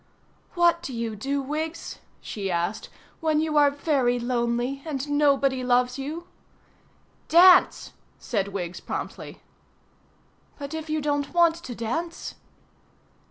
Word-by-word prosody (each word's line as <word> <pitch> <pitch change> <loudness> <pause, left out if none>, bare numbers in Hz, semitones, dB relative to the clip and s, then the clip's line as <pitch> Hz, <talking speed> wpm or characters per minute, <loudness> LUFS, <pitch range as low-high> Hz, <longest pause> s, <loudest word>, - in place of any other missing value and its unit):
"What 345 -1 +3
do 270 -7 -6
you 230 -2 -3
do, 275 +6 -2
Wiggs?" 310 +4 -4 0.2
she 200 -2 -5
asked, 175 +4 -2 0.3
"when 310 -1 +1
you 310 -1 -1
are 290 -1 +6
very 280 -4 +1
lonely 240 +2 -1
and 295 -3 -4
nobody 275 -3 +2
loves 250 +1 +2
you?" 310 +6 -5 1.0
"Dance," 360 +2 +6 0.2
said 200 -4 -2
Wiggs 185 -3 -5
promptly. - - -6 1.2
"But 285 +1 -7
if 320 0 -5
you 310 0 0
don't 290 +1 -2
want 340 -1 +5
to 270 -8 -8
dance?" 325 +10 -4
280 Hz, 120 wpm, -25 LUFS, 245-315 Hz, 1.2 s, are